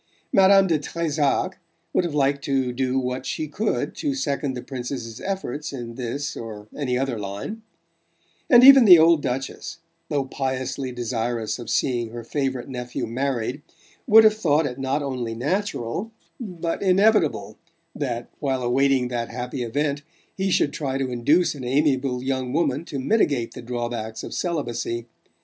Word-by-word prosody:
Madame 195 0 +6
de 165 -5 +1
Trezac 150 -2 -1 0.3
would - - +3
have 165 -4 -3
liked 140 0 +1
to 135 -3 0
do 130 +1 0
what 125 0 -2
she 155 +4 -3
could 210 +9 -2
to 285 -2 -2
second 140 - -2
the 125 - -6
Princess's 125 -3 -6
efforts 190 -7 -4
in 120 -4 -6
this 130 +4 -4
or 110 -2 -8
any 125 -4 -1
other 130 -3 -1
line; 100 - -5 0.9
and 245 -1 +8
even 270 -2 +10
the 180 -4 +10
old 165 -1 +5
Duchess 135 +6 -4 0.3
though 140 -3 0
piously 130 0 -3
desirous 120 -1 -2
of 120 - -7
seeing 120 -3 0
her 120 +1 -7
favourite 130 0 -2
nephew 125 -2 -4
married 125 +2 -2 0.5
would 220 -1 +8
have 215 -1 +6
thought 160 -7 +2
it 130 -1 -4
not 135 +2 -1
only 125 -4 -3
natural 165 - -2 0.3
but 175 -8 -4
inevitable 195 -3 +2 0.3
that, 120 -4 -3
while 135 -3 -1
awaiting 130 +1 +2
that 120 -1 -3
happy 125 +1 -5
event, 140 +5 -1 0.3
he 190 0 -1
should 145 -5 +2
try 135 -3 -2
to 135 -2 -2
induce 145 +9 +2
an 140 -3 -8
amiable 130 -1 +1
young 130 -1 -2
woman 150 -2 +1
to 145 - -5
mitigate 135 - +1
the - - -8
drawbacks 120 -2 -4
of - - -7
celibacy. 120 -8 -2
135 Hz, 155 wpm, -23 LUFS, 125-155 Hz, 0.9 s, even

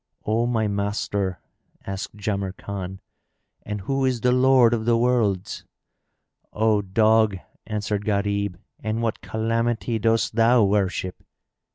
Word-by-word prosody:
"O 115 +2 +1
my 110 -3 +1
master," 100 -2 -2 0.5
asked 95 +1 -5
Jamrkan, 100 -2 -4 0.6
"and 105 -1 -5
who 135 +7 -1
is 130 -3 0
the 125 - +3
Lord 125 -2 +5
of 110 -2 -1
the 115 0 +3
Worlds?" 115 -6 0 0.9
"O 110 -1 +2
dog," 110 +1 +3 0.3
answered 105 -1 -2
Gharib, 100 -2 -1 0.2
"and 110 +2 -2
what 115 -2 -2
calamity 115 +1 -1
dost 115 +1 +1
thou 115 +1 +4
worship?" 95 -2 0
110 Hz, 120 wpm, -24 LUFS, 100-115 Hz, 0.9 s, Lord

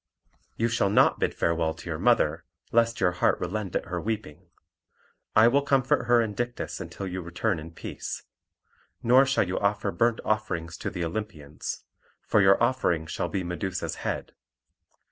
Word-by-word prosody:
"You 115 - +2
shall 115 -4 +1
not 100 - +4
bid - - 0
farewell 80 -1 0
to 80 - -11
your 80 -2 -3
mother, - - +2 0.3
lest 115 -1 +2
your 90 - +3
heart 90 - +1
relent 95 +1 -3
at - - 0
her 90 0 -3
weeping. 105 -8 -5 0.9
I 110 +2 +7
will 140 +4 +4
comfort 135 -3 +2
her 120 -1 +5
and 110 -3 -2
Dictys 120 +2 -3
until 100 - -6
you 95 0 -4
return 85 +2 -1
in 80 +1 -8
peace. 85 - -6 0.8
Nor 130 +3 +6
shall 135 -8 +2
you 90 - -1
offer 100 0 0
burnt 115 +1 +1
offerings 90 -6 -1
to - - -3
the 90 -4 -3
Olympians; 80 -6 -5 0.4
for 110 - +3
your 95 0 +6
offering 105 -10 +1
shall 80 - -3
be 95 - -2
Medusa's 90 +1 -3
head. - - -3
100 Hz, 165 wpm, -27 LUFS, 85-115 Hz, 0.9 s, I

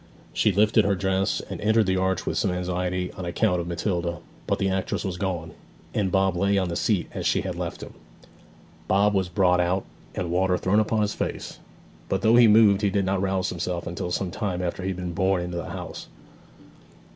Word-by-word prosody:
She 105 - +3
lifted 105 +3 +4
her 100 0 +2
dress 95 +1 0
and - - -6
entered 110 +1 +3
the 95 0 +1
arch 95 -1 0
with - - -2
some - - +1
anxiety 90 0 -2
on 95 - -8
account 90 0 +1
of 85 - -6
Matilda; 85 -1 -2 0.3
but - - +1
the 95 - 0
actress 95 +2 -2
was 95 -2 -2
gone, 90 -4 -3 0.4
and 95 -3 0
Bob 95 -1 +2
lay 100 +3 +2
on 95 -2 0
the 85 - -3
seat 100 -2 0
as - - -2
she - - +2
had - - -4
left - - -5
him. - - -10 0.9
Bob 100 +2 +3
was 95 -2 0
brought 90 0 +3
out, 90 +2 +1 0.3
and 85 -2 -3
water 90 +1 +2
thrown 95 +4 +2
upon 110 0 +1
his 105 - -1
face; - - -4 0.5
but - - -1
though 110 +1 +5
he 120 -1 +7
moved 105 -2 +6
he 100 - +2
did 100 0 0
not 95 0 0
rouse 95 -1 0
himself 85 0 -3
until 85 +1 -4
some 90 0 -2
time 90 -1 -3
after 90 +1 -3
he 95 - -2
had 95 - -3
been 90 -1 -4
borne 95 0 +1
into 90 0 -4
the 85 - -5
house. - - -7
95 Hz, 215 wpm, -25 LUFS, 90-100 Hz, 0.9 s, he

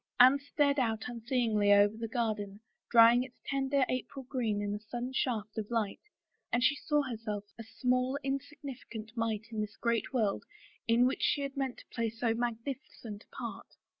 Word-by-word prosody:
Anne 260 +3 +8
stared 285 0 +1
out 225 -3 0
unseeingly 230 -3 +1
over 205 +1 +6
the 225 0 -4
garden, 215 -4 -2 0.3
drying 235 +1 +7
its 255 0 -7
tender 275 0 +1
April 265 +2 -3
green 230 -6 0
in 205 0 -2
a 210 - -3
sudden 240 +4 -5
shaft 220 -5 -1
of 210 - -4
sun, 220 -4 0 0.6
and 235 +1 +2
she 285 - +4
saw 295 0 +1
her 250 -4 -4
self 210 -2 -4
a - - -5
small, 255 +3 0
insignificant 270 -5 -5
mite 225 -2 -2
in 220 -1 -2
this 210 0 -5
great 235 -1 0
world 220 -6 +1 0.4
in 235 +2 +5
which 260 - 0
she 285 - +2
had 275 0 -4
meant 270 -3 -2
to - - -13
play 230 -1 0
so 230 +1 0
magnificent 235 -1 -4
a - - -18
part. - - -7
235 Hz, 180 wpm, -32 LUFS, 220-265 Hz, 0.6 s, Anne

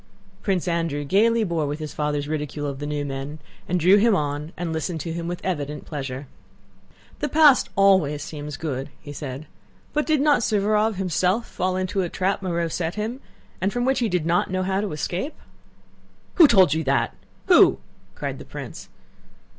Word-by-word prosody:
Prince 190 -4 0
Andrew 165 -4 -1
gaily 220 +9 +3
bore 170 -6 -1
with 145 +1 -3
his 155 -1 -6
father's 145 -1 -1
ridicule 150 -1 -3
of 140 -2 -4
the 145 - -4
new 145 -1 -2
men, 135 +2 -5 0.3
and 180 +1 +1
drew 185 +5 +6
him 220 0 +4
on 150 -1 -2
and 170 -2 -3
listened 160 +1 -2
to 165 - -4
him 170 0 -4
with 175 0 -3
evident 150 -5 -3
pleasure. 135 -2 -5 0.9
"The 295 - -1
past 295 -2 +5
always 190 -7 +3
seems 150 -1 -6
good," 140 -3 -4 0.2
said 135 -2 -6
he, 155 - -15 0.5
"but 300 0 0
did 310 -2 +3
not 295 +1 +4
Suvórov 215 0 +2
himself 185 +4 0
fall 185 0 -1
into 185 +1 -1
a 175 - -2
trap 195 +3 -1
Moreau 170 -3 -1
set 165 +1 -3
him, 225 +5 -4 0.4
and 190 +2 +1
from 245 +2 -1
which 265 +1 +2
he 235 -3 +1
did 180 -4 0
not 170 +1 +1
know 185 0 -1
how 190 +1 0
to 210 - -3
escape?" 175 - -3 1.0
"Who 335 -4 +8
told 190 - +5
you 160 +1 -1
that? 135 0 +1 0.3
Who?" - - +6 0.4
cried - - -4
the - - -10
prince. - - -8
175 Hz, 185 wpm, -24 LUFS, 150-200 Hz, 1.0 s, Who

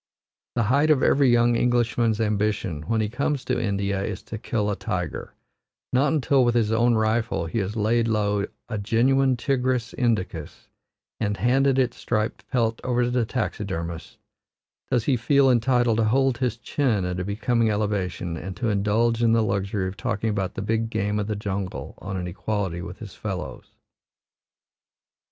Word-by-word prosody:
The 120 - +2
height 140 +8 +3
of 150 -4 +4
every 140 -2 +4
young 120 0 +4
Englishman's 120 -2 +1
ambition 105 -7 0
when 115 -1 +1
he 110 - 0
comes 135 +4 -2
to - - 0
India 100 -2 -1
is 100 -2 -4
to 110 - -7
kill 105 -2 -1
a - - -1
tiger; 95 -4 -4 0.6
not 135 +4 +3
until 140 -3 +3
with 120 -1 +2
his 110 -2 +2
own 120 +1 +3
rifle 110 -5 0
he 85 +8 -2
has 100 +1 -3
laid 115 +2 +2
low 105 -2 +1 0.2
a 110 - -3
genuine 130 +5 +2
Tigris 125 -2 0
Indicus, 95 - -2 0.5
and 105 -2 -1
handed 135 +5 +3
its 125 -2 +1
striped 110 -1 -2
pelt 115 -3 0
over 125 -1 +1
to 120 - 0
the 120 -3 +1
taxidermist, 85 -9 -4 0.7
does 125 -4 +1
he 135 +2 +2
feel 135 +3 +4
entitled 120 -1 +2
to 115 - +2
hold 130 +2 +2
his 125 -3 0
chin 115 -5 0
at 90 0 -3
a - - -1
becoming 110 +4 +1
elevation 95 -5 -2
and 95 +3 -7
to 120 - -1
indulge 110 +3 +1
in 115 -1 +4
the 115 -1 +3
luxury 100 -1 -1
of 95 +2 -6
talking 115 -2 -1
about 95 -3 -2
the - - -3
big 115 +2 0
game 105 -1 -1
of 105 - -2
the 105 - -2
jungle 100 -2 -4
on 95 0 -5
an 90 - -3
equality 90 -1 -3
with 90 +1 -7
his 105 -4 -9
fellows. 95 -4 -5
110 Hz, 175 wpm, -24 LUFS, 100-120 Hz, 0.7 s, of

